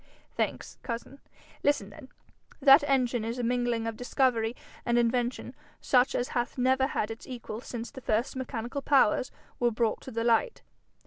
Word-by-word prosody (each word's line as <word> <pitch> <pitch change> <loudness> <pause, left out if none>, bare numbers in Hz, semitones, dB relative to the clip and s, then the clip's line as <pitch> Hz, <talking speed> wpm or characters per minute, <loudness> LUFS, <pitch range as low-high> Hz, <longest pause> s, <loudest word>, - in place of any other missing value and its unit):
'Thanks, - - -3
cousin. 240 +3 -6 0.4
Listen 215 -9 +1
then: 265 +1 -13 0.5
That 275 +1 +7
engine 250 -4 +1
is 230 +2 -3
a 245 - -2
mingling 240 -1 0
of 225 -1 -3
discovery 245 -2 +1 0.3
and 240 0 +1
invention 240 +1 0 0.3
such 250 0 +3
as 245 - -1
hath 240 +1 -2
never 260 +1 +3
had 220 -6 -2
its 225 - -9
equal 235 -3 -6
since 235 -2 -6
first 245 -3 -1
the 260 - -5
mechanical 250 +1 -4
powers 270 -3 +3 0.3
were 240 - +3
brought 230 -1 0
to - - -9
the 230 -2 -2
light. 235 - +1
245 Hz, 165 wpm, -29 LUFS, 230-260 Hz, 0.5 s, That